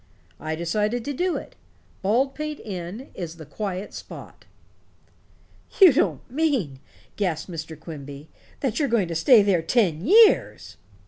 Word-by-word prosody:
I 155 0 -3
decided 210 +8 -1
to 285 - -3
do 360 +6 -1
it. - - -10 0.5
Baldpate 270 +8 -1
Inn 195 +5 -7
is 170 -2 -6
the 160 - -10
quiet 195 +4 -5
spot." - - -11 1.3
"You 370 -7 +9
don't - - 0
mean," 255 - -1 0.4
gasped 180 -3 -2
Mr. 160 -2 -7
Quimby, 145 -2 -9 0.3
"that 265 -2 -1
you're 285 -3 +1
going 215 -7 +1
to - - -3
stay 215 - +6
there 190 -4 +2
ten 175 -4 +1
years?" 425 - +4
205 Hz, 135 wpm, -24 LUFS, 165-265 Hz, 1.3 s, You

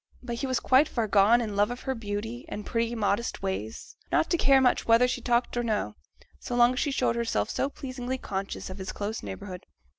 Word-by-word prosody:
But 240 -1 -4
he 270 - -2
was 255 -1 0
quite 270 +4 +4
far 235 - -1
enough 215 - -4
gone 215 +4 +5
in 215 -3 -3
love 205 +1 +3
of 245 +1 -6
her 265 - -2
beauty, 225 +2 -5
and 210 -7 -6
pretty 230 0 -1
modest 210 0 -1
ways, 150 - -4 0.2
not - - +2
to - - +4
care 270 -1 +6
much 255 -2 +2
whether 230 +2 +6
she 250 - -2
talked 240 0 +1
or 240 - 0
no, 210 - -1 0.4
so - - -4
long 240 +1 +5
as 255 - -3
she 295 - +1
showed 250 -4 +1
herself 235 -1 -1
so 275 - 0
pleasingly 255 -2 -5
conscious 195 -4 -5
of 185 - -8
his 190 - -4
close 210 +2 -4
neighbourhood. 180 - -8
235 Hz, 230 wpm, -27 LUFS, 205-250 Hz, 0.4 s, care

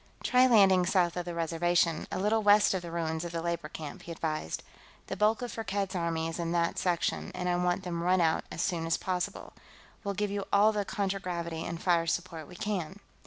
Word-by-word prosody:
"Try 255 0 +5
landing 190 -6 +5
south 175 -2 +2
of 180 -1 -3
the 175 -1 -5
Reservation, 170 0 +1
a - - -2
little 210 +4 +2
west 205 0 +5
of 190 - -1
the 170 - -7
ruins 165 -1 -2
of 170 - -5
the 170 - -3
labor 170 -1 -2
camp," 150 -3 -7
he 170 - -9
advised. 155 - -3 0.4
"The - - -4
bulk 215 +3 +2
of 245 - -4
Firkked's 200 -3 -3
army 165 -2 -1
is 165 +1 -5
in 170 0 -1
that 170 -1 +1
section, 175 -2 -1
and 180 0 -3
I 175 - +2
want 180 +1 0
them 170 -2 -3
run 180 +2 +3
out 165 -2 +2
as 165 - -2
soon 165 -4 -1
as 165 - +2
possible. 180 -1 -3 0.5
We'll 200 -1 -2
give 210 +1 -1
you 200 -1 -2
all 205 +2 +5
the 205 -2 -1
contragravity 180 -5 -3
and 170 -1 -4
fire 170 -2 +2
support 165 -2 -3
we 180 - -12
can." 190 -1 -3
175 Hz, 215 wpm, -30 LUFS, 170-195 Hz, 0.5 s, Try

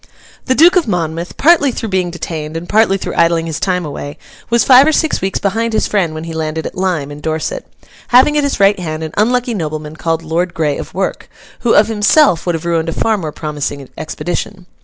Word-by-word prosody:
The 260 - +2
Duke 345 +6 +6
of 345 - +1
Monmouth, 170 -3 -3
partly 305 -3 +4
through 225 -2 -5
being 185 -2 0
detained 160 -2 -5
and 170 +2 -7
partly 215 -2 +3
through - - -5
idling 170 -1 +2
his 160 -2 -4
time 180 -3 -1
away, 145 0 -7 0.3
was 235 0 +3
five 265 +2 +7
or - - +4
six 315 0 0
weeks 190 +1 -1
behind 225 +3 -1
his 220 - +1
friend 175 -7 0
when 155 - -6
he 165 0 -6
landed 160 0 -3
at - - -5
Lyme, 175 -7 -2
in 145 0 -9
Dorset: 160 - -3 0.4
having 260 +4 +5
at 295 - +2
his 280 -5 -1
right 200 0 +4
hand 160 -2 -4
an 155 - -6
unlucky 245 +3 +1
nobleman 155 -4 -4
called 165 0 -2
Lord 170 +3 -2
Grey 150 -3 0
of - - -8
Werk, 190 +1 -3 0.3
who 235 - +2
of 210 - +5
himself 220 - +3
would 175 - +1
have 165 +1 -6
ruined 165 -1 0
a - - -3
far 225 -1 +1
more 165 -7 -4
promising 145 -2 -5
expedition. 175 +4 -5
175 Hz, 220 wpm, -15 LUFS, 160-225 Hz, 0.4 s, five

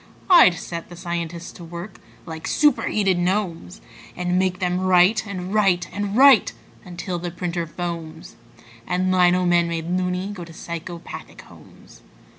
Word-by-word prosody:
I'd 335 - +8
set 170 0 -7
the 175 - -10
scientists 170 -1 -5
to 175 - -12
work 170 +4 -9 0.3
like 160 -1 -7
superheated 210 -10 +2
gnomes, 175 - -2 0.3
And 180 0 0
make 185 -1 0
them 180 -1 -1
write 185 +4 +3
and 185 -1 -5
write 195 -5 +2
and 205 +1 -3
write 270 -4 +6 0.3
until 175 0 -5
the 175 +1 -4
printer 170 -1 -4
foams 165 -2 -6 0.5
And 185 +1 0
lino 180 0 +3
men, 175 -1 +3
made 165 -1 -4
"loony", 180 +1 -1
go 180 -4 -8
to 165 -1 -12
psychopathic 170 +1 -8
homes. - - -17
180 Hz, 145 wpm, -22 LUFS, 170-185 Hz, 0.5 s, I'd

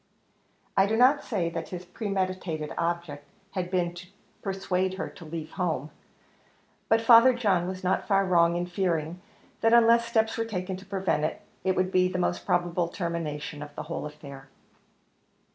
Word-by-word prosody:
I 195 0 +4
do 220 +2 0
not 260 +4 +5
say 175 -7 -1
that 165 0 -5
his 180 0 -6
premeditated 185 -5 -3
object 170 -4 -2 0.3
had 185 -2 -3
been 175 -2 0
to 175 +1 -10 0.3
persuade 190 -1 -1
her - - -4
to 170 - -13
leave 155 0 -6
her - - -15
home, 160 -6 -1 1.0
but 225 0 +4
Father 235 +2 +7
John 195 -7 +1
was 185 0 -5
not 185 +1 0
far 195 -1 +3
wrong 170 -2 +4
in 175 0 -1
fearing, 175 -2 -2 0.4
that 225 +1 +3
unless 235 0 +6
steps 225 -1 +1
were 225 - 0
taken 190 -3 -3
to 190 +1 -13
prevent 190 -6 0
it, 155 - -2 0.2
it 190 0 +1
would 185 0 0
be 185 -1 +4
the 185 - -3
most 85 0 -1
probable 175 0 +1
termination 165 -4 -4
to 150 0 -7
the - - -5
whole 155 -1 -4
affair. 140 -2 -11
180 Hz, 175 wpm, -27 LUFS, 170-195 Hz, 1.0 s, Father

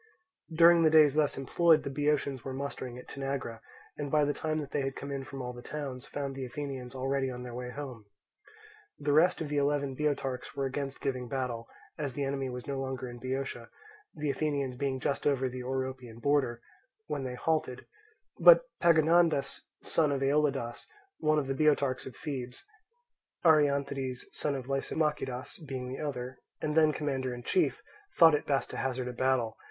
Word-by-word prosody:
During 170 +1 +7
the 160 - +6
days 155 -3 +6
thus 150 -1 +2
employed 155 +4 +4
the 140 - -4
Boeotians 145 -2 0
were 135 -1 -5
mustering 130 -3 -5
at 125 - -11
Tanagra, 135 -4 -4 0.4
and 145 -1 -3
by 150 0 +3
the 145 - +1
time 155 0 -2
that 145 -3 -4
they 145 - 0
had 135 0 -2
come 140 - -6
in 135 -1 -3
from 135 0 -7
all 125 0 -4
the 120 - -9
towns, 135 -2 -6
found 140 -1 -4
the 135 0 -5
Athenians 130 -1 -5
already 135 +1 0
on 125 -1 -6
their 125 -1 -7
way 125 +1 -5
home. 125 -6 -7 0.9
The 145 0 0
rest 170 +4 +4
of 155 - -3
the 145 - -1
eleven 140 -1 +1
Boeotarchs 135 -3 -2
were 135 - -1
against 135 0 -4
giving 130 -3 -2
battle, 120 -3 -3 0.3
as 140 -4 -2
the 140 - -2
enemy 135 -1 -1
was 125 0 -6
no 140 -1 -3
longer 130 -1 -3
in 120 0 -8
Boeotia, 130 -2 -4 0.5
the 150 -2 -1
Athenians 140 -2 -1
being 130 0 -1
just 140 - -1
over 135 -2 +2
the 130 0 -5
Oropian 130 -2 -4
border, 130 -3 +1 0.4
when 145 -6 -3
they 125 -1 -4
halted; 155 -3 -1 0.5
but - - +8 0.2
Pagondas, 165 -2 +4 0.2
son 155 -3 +2
of 135 -1 0
Aeolidas, 135 -4 0 0.3
one 155 -1 +3
of 150 - +1
the 135 - -1
Boeotarchs 140 -3 +2
of 130 - -9
Thebes 130 - -6 0.8
(Arianthides, 140 -4 +2
son 145 -2 -2
of 130 -2 -5
Lysimachidas, 135 -1 -2
being 130 -2 -4
the 130 - -5
other), 130 -4 -4 0.2
and 150 0 -2
then 155 -1 +6
commander 135 -4 -2
in 120 - -9
chief, 365 - +1 0.3
thought 165 -2 +8
it 150 - 0
best 140 -2 0
to - - -6
hazard 130 -1 -2
a 125 - -4
battle. 125 -3 0
135 Hz, 185 wpm, -30 LUFS, 130-150 Hz, 0.9 s, but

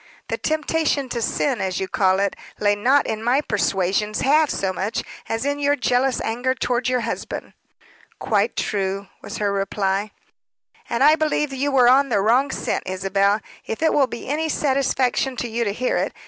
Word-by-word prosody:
"The - - -1
temptation 310 -3 0
to 240 -1 -3
sin, 255 +1 0
as 190 -1 -2
you 190 - -2
call 190 0 +2
it, 200 -1 0 0.2
lay 205 0 +3
not 260 +7 +3
in 220 0 -3
my 245 +4 +3
persuasions 210 -3 0
half 300 +2 +4
so 190 -1 -1
much 195 +4 -2 0.3
as 225 +3 -2
in 285 0 -1
your 285 0 +2
jealous 255 -1 +1
anger 245 +3 -1
toward 245 0 -1
your 250 -1 +1
husband." 230 0 -5 0.6
"Quite - - 0
true," 195 -1 -2
was - - -7
her 205 -1 0
reply. 195 +1 -1 0.8
"And 235 - +1
I 300 +2 +7
believe 305 -2 0
you 280 +2 -1
were 255 -3 +5
on 275 +2 +5
the 210 -4 +2
wrong 240 +7 +3
scent, - - -2
Isabel 195 +2 +1 0.3
if 225 - -3
it 320 - +3
will 275 -3 +3
be 235 - -8
any 310 +4 -1
satisfaction 265 -2 +1
to 245 - -3
you 235 +1 -1
to 200 - 0
hear 250 +5 -1
it. - - -1
240 Hz, 185 wpm, -22 LUFS, 200-275 Hz, 0.8 s, I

